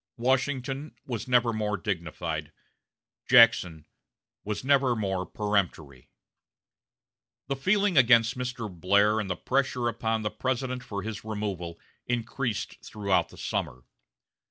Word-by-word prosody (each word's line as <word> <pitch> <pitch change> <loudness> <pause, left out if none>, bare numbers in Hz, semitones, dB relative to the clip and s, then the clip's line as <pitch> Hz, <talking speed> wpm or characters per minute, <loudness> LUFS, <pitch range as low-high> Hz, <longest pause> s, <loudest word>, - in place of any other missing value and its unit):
Washington 135 +3 -1
was 115 -3 -4
never 120 -2 +3
more 105 -1 -1
dignified; 85 -7 -4 0.8
Jackson 90 -10 +5 0.6
was 105 +1 -4
never 135 -2 +3
more 95 -4 -2
peremptory. 90 - -2 1.4
The 140 - -2
feeling 195 +5 +2
against 115 -2 +5
Mr. 125 -2 -4
Blair 100 +4 +2
and 105 -3 -3
the 90 - -1
pressure 130 +1 0
upon 115 -1 -1
the 105 - -1
President 130 0 -2
for 100 -2 -5
his 110 -1 -5
removal 100 -6 -4 0.3
increased 120 -2 -3
throughout 100 -3 0
the - - -15
summer. - - -3
110 Hz, 115 wpm, -27 LUFS, 100-125 Hz, 1.4 s, Jackson